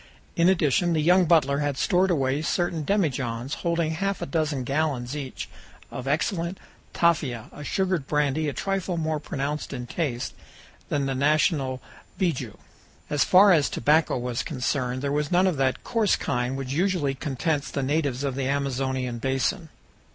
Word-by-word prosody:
In 170 +1 +4
addition, 175 -1 +2
the 160 - +1
young 180 +4 +4
butler 150 -4 +3
had 145 -2 -1
stored 185 +3 +2
away 140 -3 +1
certain 170 -1 -1
demijohns, 135 - -1
holding 170 -2 0
half 195 +4 -1
a - - -3
dozen 150 -3 -1
gallons 140 -1 -1
each, 135 -3 -5 0.4
of 125 - -6
excellent 170 +5 -1 0.3
"tafia," 145 -9 0
a 145 - -9
sugared 185 -3 -1
brandy 150 +1 +1
a - - -4
trifle 195 -1 -2
more 155 -1 -1
pronounced 145 -1 -4
in 125 -2 -5
taste 125 -4 -3 0.6
than 145 -1 0
the 135 - -1
national 140 -1 +1 0.4
beiju. 135 - -1 0.5
As 145 -1 +3
far 195 +2 +6
as 155 -5 +4
tobacco 150 +2 +2
was 120 -1 -2
concerned, 130 -3 -2
there 140 - 0
was 145 0 0
none 180 +1 +4
of 180 -6 +1
that 135 -1 0
coarse 225 -4 +2
kind 125 +2 -2
which 135 -1 -4
usually 170 -4 +1
contents 145 +2 -2
the 140 - -2
natives 140 -2 0
of 140 -2 -1
the 135 0 -2
Amazonian 130 -3 -1
basin. 135 +6 -1
145 Hz, 160 wpm, -25 LUFS, 135-170 Hz, 0.6 s, far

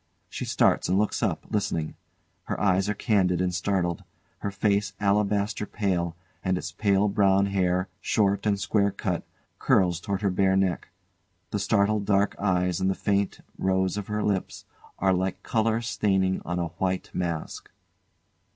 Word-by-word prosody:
She - - -5
starts - - +2
and 95 - +3
looks 105 +1 0
up, 100 -9 -1
listening. 85 -7 -1 0.5
Her - - -3
eyes 95 0 +2
are 105 - 0
candid 95 -5 +2
and 90 0 0
startled, 90 -2 -1 0.4
her 100 - -2
face 100 0 0
alabaster 105 +1 +1
pale, 90 -5 -1 0.3
and 95 0 +1
its - - -5
pale 100 -1 +2
brown 100 -1 +3
hair, 95 -1 +1
short 100 -1 +1
and 100 -1 +1
square 100 0 +2
cut, 90 -3 -2 0.4
curls 90 -3 +3
towards 100 +2 -3
her 100 - +2
bare 95 +1 +2
neck. 95 -4 0 0.6
The 105 - -1
startled 100 0 +2
dark 100 0 +2
eyes 90 -2 +1
and 95 0 +1
the 95 - 0
faint 100 -1 -1 0.2
rose 95 0 +1
of 105 -2 -4
her 105 0 -2
lips 100 -3 -2 0.3
are 95 0 +2
like 95 0 -2
colour 115 0 +1
staining 100 -4 +1
on 90 +1 -3
a 85 -1 -1
white 95 -1 -1
mask. 85 -3 -4
95 Hz, 160 wpm, -26 LUFS, 90-100 Hz, 0.6 s, and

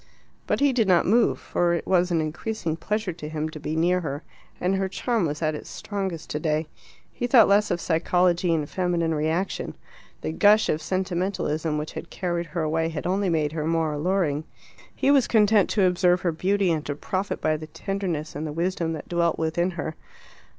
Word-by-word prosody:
But - - 0
he 285 -2 +4
did 230 -4 +2
not 180 -3 +4
move, 230 +5 +3
for 175 -1 0
it 170 - -4
was 180 -1 +2
an 170 -2 +1
increasing 165 +2 -3
pleasure 210 +1 -2
to 150 -2 -8
him 155 0 -3
to 155 - -9
be 155 +1 -3
near 175 +3 +2
her, 145 -1 -4 0.4
and 180 +2 +1
her 195 0 0
charm 225 -2 0
was 150 +2 -4
at 155 0 +1
its 150 - -7
strongest 190 -6 -4
today. 155 +1 -1 0.5
He 245 - -2
thought 240 -3 +7
less 205 +1 +3
of - - 0
psychology 175 +1 +2
and 155 -3 0
feminine 175 -2 0
reaction. 160 +5 -1 0.5
The 80 - -2
gush 210 - +4
of 155 - 0
sentimentalism 175 -3 -1
which 150 +1 -4
had 165 - -7
carried 175 -2 -2
her 160 +1 -3
away 160 +1 0
had 160 -3 -5
only 190 +1 +1
made 155 -3 +1
her 155 -1 -3
more 165 -2 +1
alluring. 155 -1 0 0.5
He 275 - +2
was 275 -3 +4
content 210 -2 +4
to 200 -3 +3
observe 180 0 +3
her 175 - +1
beauty 190 +3 +1
and 155 -2 -1
to 145 - -2
profit 185 +6 -3
by 155 0 +1
the 155 0 -7
tenderness 175 -3 -4
and 155 +2 -3
the - - -4
wisdom 170 0 -1
that 155 - -7
dwelt 170 -1 +1
within 165 +2 0
her. 160 - -3
170 Hz, 200 wpm, -25 LUFS, 155-190 Hz, 0.5 s, thought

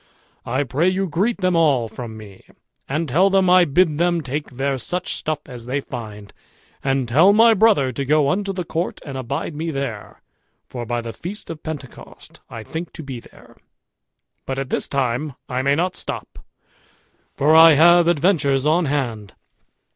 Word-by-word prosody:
I 130 +4 0
pray 145 +7 +1
you 190 +1 -1
greet 200 +7 -1
them 185 -1 +2
all 145 -8 +3
from 110 -1 -8
me, 100 -3 -13 0.5
and 155 +4 -1
tell 175 +9 +3
them 190 -2 +3
I 180 -1 +6
bid 155 0 +2
them 175 -1 +1
take 145 +1 -4
there 135 +1 -2
such 180 +7 -3
stuff 155 -1 -3
as 120 -3 -10
they 135 +3 -1
find; 105 -6 -9 0.5
and 135 -2 0
tell 160 +12 +5
my 225 +2 +6
brother 200 - +3
to 140 +3 -4
go 150 +1 +2
unto 195 +1 -1
the 185 -2 -4
court 165 +1 -3
and 140 -3 -7
abide 135 +5 -4
me 160 +3 -4
there, 135 -8 -6 0.4
for 120 -2 -7
by 120 0 -2
the 115 -1 -7
feast 200 +3 -8
of 160 -2 -9
Pentecost 150 -5 -10
I 115 - -8
think 160 +8 -6
to 160 - -9
be 135 -4 -7
there; - - -18 0.9
but 135 - -3
at 135 -1 -4
this - - -1
time 135 +1 -2
I 125 0 -2
may 140 +1 +2
not 180 +4 -1
stop, - - -7 1.0
for 150 +3 +3
I 165 0 +9
have 170 +3 +6
adventures 150 -5 +2
on 165 +3 +2
hand." 120 -8 -3
145 Hz, 175 wpm, -21 LUFS, 130-175 Hz, 1.0 s, I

